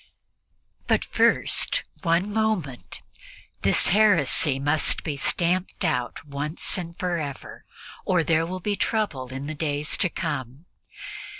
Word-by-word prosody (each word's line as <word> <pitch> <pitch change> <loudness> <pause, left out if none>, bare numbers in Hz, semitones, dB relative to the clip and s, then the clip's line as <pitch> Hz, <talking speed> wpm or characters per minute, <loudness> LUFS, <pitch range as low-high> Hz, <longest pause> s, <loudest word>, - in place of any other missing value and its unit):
But - - +2
first - - +2 0.2
one 180 +3 +1
moment 175 - -2 0.6
this - - +3
heresy 170 -8 +4
must 145 +3 +1
be 150 -4 -3
stamped 180 +6 0
out 125 -2 -2
once 145 +3 -2
and 170 -2 -5
forever 165 -7 -4 0.4
or 180 -3 +2
there 165 0 +2
will 185 +1 -4
be 205 +2 -1
trouble 200 - -1
in 135 +2 -6
the 155 - -4
days 150 -1 -1
to 185 - +2
come. 145 -3 -4
160 Hz, 120 wpm, -25 LUFS, 140-185 Hz, 0.6 s, heresy